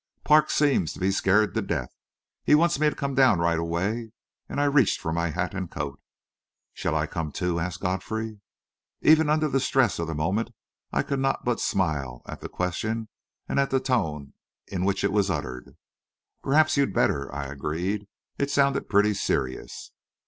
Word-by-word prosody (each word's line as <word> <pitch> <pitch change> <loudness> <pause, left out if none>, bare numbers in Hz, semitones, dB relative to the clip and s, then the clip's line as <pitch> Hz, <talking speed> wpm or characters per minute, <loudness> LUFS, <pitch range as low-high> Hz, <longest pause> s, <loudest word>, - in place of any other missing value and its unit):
"Parks 155 0 +4
seems 135 - +2
to - - -11
be 95 +1 +1
scared 100 +2 +2
to - - 0
death. 60 - -3 0.5
He 150 - +5
wants 170 -1 +3
me 155 0 +4
to - - -7
come 140 0 -2
down 130 -6 +5
right 85 0 +1
away," 100 +8 -2 0.4
and - - -3
I - - +3
reached 140 -5 +3
for 80 - -3
my 85 0 0
hat 90 +2 -2
and 95 -3 -4
coat. 70 -1 -5 0.7
"Shall - - -2
I - - +1
come, 80 -2 -4
too?" 90 0 -1
asked 85 +1 -4
Godfrey. 105 +4 -3 0.6
Even 155 -1 +5
under 155 0 +2
the 135 -2 +1
stress 130 -7 +2
of 85 - -2
the 80 - -3
moment, 95 +9 0 0.4
I - - +1
could 140 - -2
not 135 0 0
but 120 -2 0
smile 70 -10 -1
at - - -8
the - - -6
question 110 +5 -2 0.4
and - - 0
at 140 - +2
the 130 - +2
tone 80 - -1 0.3
in 95 -1 -3
which 100 0 0
it - - +2
was 100 -1 +2
uttered. 70 -7 -5 0.6
"Perhaps 155 +2 +3
you'd 140 -9 +1
better," 70 -1 +1
I 70 +1 -4
agreed. 85 +9 -3 0.3
"It 140 - 0
sounded 140 -1 +1
pretty 105 +1 +4
serious." 65 -9 -3
100 Hz, 185 wpm, -26 LUFS, 85-135 Hz, 0.7 s, He